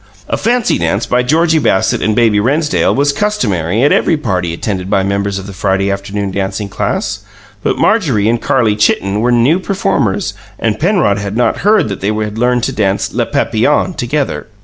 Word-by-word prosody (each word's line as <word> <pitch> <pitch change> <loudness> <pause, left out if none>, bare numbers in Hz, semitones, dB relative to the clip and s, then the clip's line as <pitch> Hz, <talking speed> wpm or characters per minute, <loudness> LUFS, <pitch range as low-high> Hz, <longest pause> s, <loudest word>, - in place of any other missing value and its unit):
A - - -1
fancy 235 +1 +1
dance 85 +6 0
by 125 - +1
Georgie 160 +5 +2
Bassett 115 -8 +1
and 110 0 +1
Baby 110 -3 +3
Rennsdale 145 +8 +1
was 140 +1 +2
customary 110 - 0
at 145 - +4
every 165 - +2
party 90 - -2
attended 95 +2 -4
by 100 -2 +2
members 100 0 -1
of 95 - -6
the 100 - -8
Friday 95 +1 0
Afternoon 100 0 -3
Dancing 100 +1 -3
Class; - - -2 0.4
but - - -1
Marjorie 140 - +2
and 115 +1 +1
Carlie 115 -6 +1
Chitten 105 -1 +1
were 120 +2 +2
new 125 +9 +3
performers, 195 0 -1 0.2
and 110 -2 -1
Penrod 170 - +2
had 100 +2 -4
not 120 - +1
heard 210 -4 +2
that 100 - -5
they 100 - -1
had 110 0 -3
learned 125 0 +1
to - - 0
dance 95 0 -1
"Les - - 0
Papillons" 150 +10 0
together. 140 +3 -2
110 Hz, 185 wpm, -14 LUFS, 100-145 Hz, 0.4 s, at